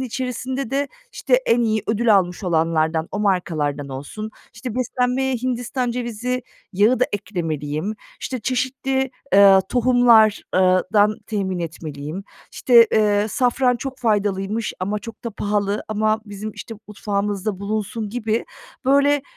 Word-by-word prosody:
içerisinde 255 0 -3
de, 280 +1 0 0.2
işte, - - 0
en 240 +1 +3
iyi 220 -2 +1
ödül 220 0 +3
almış 180 +1 -1
olanlardan, 160 -1 +1
o - - -4
markalardan 155 -8 -1
olsun. 145 +12 -6 0.2
İşte, 250 -4 -6
beslenmeye 255 +1 0
Hindistan 245 0 -2
cevizi 245 +1 -3 0.3
yağı 210 +7 +3
da - - +6
eklemeliyim, 165 -2 -3 0.3
işte, 255 -3 -4
çeşitli, 260 +2 -1 0.2
eee, 195 -1 +8
tohumlar 245 -3 +4
ııı 185 0 +4
dan 210 0 +3
temin 190 -4 -2
etmeliyim, 160 +1 -6 0.3
işte, 235 -2 +6
eee, 210 -1 +3
safran 250 +2 +2
çok 270 +1 -6
faydalıymış 210 -1 0
ama 205 +3 -1
çok 230 +1 -11
da 235 - -2
pahalı 205 0 -1
ama 215 +1 +1
bizim, 205 +1 -6
işte, 225 - -8
mutfağımızda 205 -1 -2
bulunsun 215 +1 -3
gibi, 225 -1 -1 0.4
böyle, 280 +1 +3
215 Hz, 130 wpm, -21 LUFS, 195-245 Hz, 0.4 s, eee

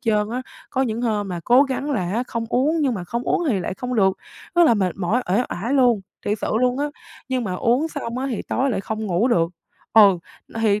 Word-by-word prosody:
trơn 215 -2 +1
á. 250 +2 -3 0.3
Có 265 -1 +1
những 235 -1 -2
hôm 210 -4 0
mà 175 -2 -4
cố 250 +3 +6
gắng 275 +1 -2
là 185 -9 -1
á 235 +4 0
không 230 -1 -3
uống 300 +6 +2
nhưng 270 -5 +1
mà 185 -4 -5
không 235 +7 -3
uống 350 - 0
thì 205 -8 +1
lại 185 - -3
không 250 +3 -4
được, 190 -2 +3 0.4
rất 345 -1 +6
là 235 - +5
mệt 185 -4 0
mỏi, 205 +7 0
uể 210 +6 +3
oải 230 +10 -2
luôn, 245 -6 +4 0.3
thiệt 210 +1 0
sự - - -2
luôn 250 +1 +2
á, 290 - 0 0.4
nhưng 255 -3 -1
mà 185 - -2
uống 245 - +1
xong 250 -6 -5
á, 265 - -2
thì 225 - -3
tối 270 +1 +1
lại 210 - -1
không 220 +1 -4
ngủ 185 +6 +1
được. 170 -7 +2 0.4
Ừ, 200 -5 +7 0.3
n - - -18
thì, 210 -1 +3
230 Hz, 250 wpm, -22 LUFS, 200-255 Hz, 0.4 s, Ừ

